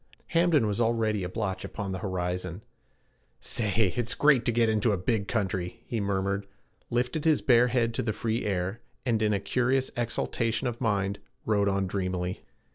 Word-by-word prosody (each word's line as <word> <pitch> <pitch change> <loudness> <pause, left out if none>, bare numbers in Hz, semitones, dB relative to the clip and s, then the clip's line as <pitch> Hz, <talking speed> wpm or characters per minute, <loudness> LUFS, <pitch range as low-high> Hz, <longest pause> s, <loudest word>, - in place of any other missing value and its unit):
Hamden 165 -7 +3
was 105 +2 0
already 110 -3 +1
a 90 - -3
blotch 95 -2 -3
upon 100 -1 -5
the 95 - -3
horizon. 90 -1 -3 0.8
'Say, 105 -3 +1
it's 120 0 0
great 145 -5 +4
to - - +3
get 115 0 +3
into 110 0 +2
a - - 0
big 100 +2 0
country,' 95 0 -2
he 115 - -2
murmured, 100 0 -1 0.4
lifted 125 +5 0
his 160 -2 +3
bare 120 -1 +5
head 120 -2 +1
to - - -1
the 110 - -1
free 115 +2 -1
air, 95 +3 -2 0.2
and 115 -4 +1
in 105 -1 +3
a 100 - +1
curious 130 +4 +1
exaltation 115 0 -1
of 120 0 -4
mind 100 -3 0 0.3
rode 100 -2 +2
on 100 0 +1
dreamily. 90 -1 -2
110 Hz, 175 wpm, -28 LUFS, 95-120 Hz, 0.8 s, bare